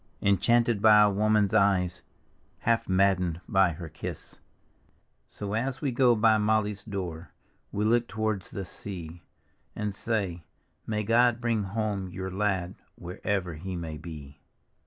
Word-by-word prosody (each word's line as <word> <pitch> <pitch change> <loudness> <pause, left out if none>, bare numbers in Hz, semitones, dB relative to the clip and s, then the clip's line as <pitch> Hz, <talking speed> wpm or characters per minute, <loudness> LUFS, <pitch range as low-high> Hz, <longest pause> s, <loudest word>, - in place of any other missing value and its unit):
Enchanted 115 +2 +3
by 105 -1 +7
a 105 - +4
woman's 105 0 +2
eyes, 95 -4 +2 0.6
Half 115 0 +1
maddcncd 95 -3 +2
by 95 -3 +3
her 85 +1 -8
kiss. 75 - -7 0.9
So 100 -1 -6
as 130 +4 -1
we 140 -2 -1
go 120 -1 +4
by 110 0 +4
Molly's 105 -1 0
door 90 -5 -5 0.4
We 105 +1 -1
look 120 +2 +2
towards 110 -2 -2
the 100 -4 -5
sea, 90 -3 -8 0.5
And 105 -1 -3
say, 100 -5 -2 0.2
" - - -43
May 105 -1 -1
God 120 +2 +3
bring 115 -2 0
home 100 -1 -2
your 95 +1 -5
lad 95 -2 -1 0.2
Wherever 90 0 -3
he 90 +4 -6
may 80 -3 -5
be." 75 -3 -10
100 Hz, 140 wpm, -28 LUFS, 90-110 Hz, 0.9 s, by